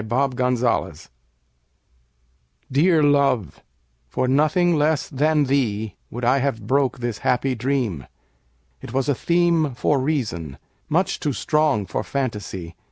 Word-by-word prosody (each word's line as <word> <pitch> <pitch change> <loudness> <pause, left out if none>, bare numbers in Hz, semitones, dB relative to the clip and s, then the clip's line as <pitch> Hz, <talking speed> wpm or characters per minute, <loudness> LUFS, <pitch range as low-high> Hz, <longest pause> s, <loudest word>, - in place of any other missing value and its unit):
The 120 +6 +1
Dream 125 -7 0 1.8
DEAR 155 +3 +3
love, 140 - +2 0.5
for 130 - -1
nothing 155 +6 +3
less 150 0 +1
than 150 +2 +1
theeWould 115 -3 -2
I 130 +3 +3
have 125 -6 -2
broke 135 +2 +1
this 120 -3 -4
happy 130 +1 +1
dream; 120 - -2 0.7
It - - -9
was 130 -1 0
a 145 - +3
themeFor 155 -4 +1
reason, 105 - -2 0.3
much 175 +3 +1
too 145 - -1
strong 150 -8 +1
for - - -3
fantasy. 105 -10 -4
135 Hz, 115 wpm, -22 LUFS, 115-150 Hz, 1.8 s, DEAR